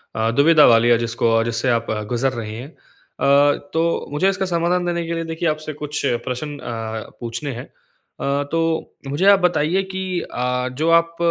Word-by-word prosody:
अ, 110 0 +1
दुविधा 150 +4 +5
वाली 115 0 +5
है, 120 - +5
जिसको 115 -1 +1
जिससे 115 +2 -1
आप 115 -1 0 0.2
गुज़र 130 +2 0
रहे 110 -3 -5
हैं। 125 +5 -7
अ, 145 -2 0 0.2
तो 165 +1 0
मुझे 165 +7 +2
इसका 190 0 -1
समाधान 175 0 0
देने 170 -1 -1
के 170 - -2
लिए, 165 0 -2
देखिए, 165 +1 -3
आपसे 155 0 -4
कुछ 150 0 -5 0.2
प्रश्न 145 +4 -4
अ, 110 -1 -5
पूछने 120 +4 -4
हैं। 120 - -7
अ, 140 +1 -5
तो 165 -1 -1
मुझे 145 +7 -1
आप 200 - +6
बताइए 180 +1 +1
कि 185 -1 -2
अ, 125 -1 -2
जो 160 - +2
आप 170 0 -16
145 Hz, 180 wpm, -20 LUFS, 120-165 Hz, 0.2 s, आप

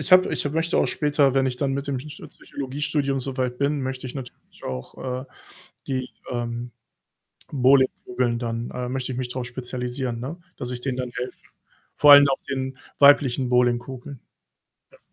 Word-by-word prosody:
Ich - - -2
habe 185 0 +7
ich 145 - -1
möchte 165 +2 +1
auch - - +3
später, 145 -3 +2
wenn 135 -1 +3
ich 125 -1 -2
dann 135 0 0
mit 140 +1 -4
dem 135 - 0
Psycho 145 +3 -8
Psychologiestudium 140 0 -2
so 130 0 -4
weit 125 -1 -1
bin, 140 0 +1
möchte 130 0 -4
ich 125 - -7
natürlich 130 -3 -10
auch, 125 - -5
äh, - - -11 0.6
die, 130 -1 -2 0.2
ähm, 120 0 -3 0.8
Bowlingkugeln 130 -2 +2
dann 115 0 -3
äh, 125 0 -3
möchte 130 0 -3
ich 125 - -5
mich 125 -1 -2
drauf 125 0 -4
spezialisieren, 125 0 -4
ne? 135 +8 -5 0.2
Dass 125 0 -4
ich 125 - -5
denen 130 -1 -2
dann 125 -1 -3
helfe. 125 +1 -4 0.6
Vor 145 -1 +8
allen 145 0 +9
auch 135 - +1
den 130 -1 -3 0.2
weiblichen 135 -3 +5
Bowlingkugeln. 125 +2 0 0.7
Ja. - - -20
130 Hz, 175 wpm, -24 LUFS, 125-140 Hz, 0.8 s, allen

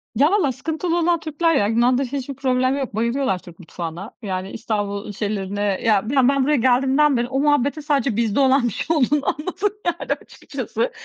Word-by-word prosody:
Ya 290 - +4
vallahi 360 -11 +2
sıkıntılı 320 +6 -2
olan 340 0 +2
Türkler 325 +1 0
ya, 205 -7 +2
Yunan'da 240 +4 +2
hiçbir 275 +1 -4
problem 255 0 +1
yok, 265 -6 -4
bayılıyorlar 235 -2 0
Türk 175 0 -15
mutfağına. 175 +4 -7
Yani 190 -1 -4
İstanbul 205 -2 -3
şeylerine, 205 -1 -3
ya, 205 +1 +1
ben 265 -1 +4
ben 275 -1 +2
buraya 295 +3 +2
geldiğimden 265 +3 +3
beri 240 0 0
o 265 +2 -1
muhabbetin 290 +1 +2
sadece 280 -5 0
bizde 225 +1 +1
olan 270 -1 +4
bir 230 - -3
şey 320 +8 -1
olduğunu 285 +1 +2
anladım 370 +6 -2 0.2
yani 345 0 -1
açıkçası. - - -4
260 Hz, 180 wpm, -21 LUFS, 215-290 Hz, 0.2 s, Ya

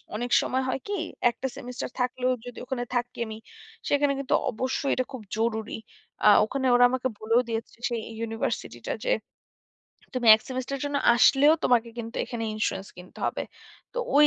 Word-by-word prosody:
অনেক 240 +3 -3
সময় 260 +1 -1
হয় 265 - -1
কি 410 - -2 0.4
একটা 265 +3 -4
সেমিস্টার 250 0 -5
থাকলেও 250 0 0
যদি 245 -1 -9
ওখানে 250 -1 -2
থাকি 245 0 -2
আমি 220 0 -6 0.5
সেখানে 285 0 +3
কিন্তু 275 - -1 0.2
অবশ্যই 260 +4 -1
এটা 255 - 0
খুব 260 - -6 0.2
জরুরি। 220 -1 -1 0.5
আ - - +8 0.2
ওখানে 265 +4 -3
ওরা 245 0 +7
আমাকে 260 0 0
বলেও 230 +3 +3
দিয়েছে 225 0 -4
সেই 235 -2 -2 0.2
ইউনিভার্সিটি 225 0 -3
টা - - +1
যে - - +2 1.1
তুমি 240 -3 +2
১ 220 - -16
সেমিস্টার 260 +1 -3
এর - - -7
জন্য 285 0 -1 0.2
আসলেও 270 +5 +6
তোমাকে 240 -1 +3
কিন্তু 230 0 -6
এখানে 235 -2 -4
ইন্সুরেন্স 195 -2 -2
কিনতে 180 +1 -13
হবে। - - -2 0.5
তো - - -4 0.2
ওই 300 - +8
245 Hz, 175 wpm, -27 LUFS, 230-260 Hz, 1.1 s, আ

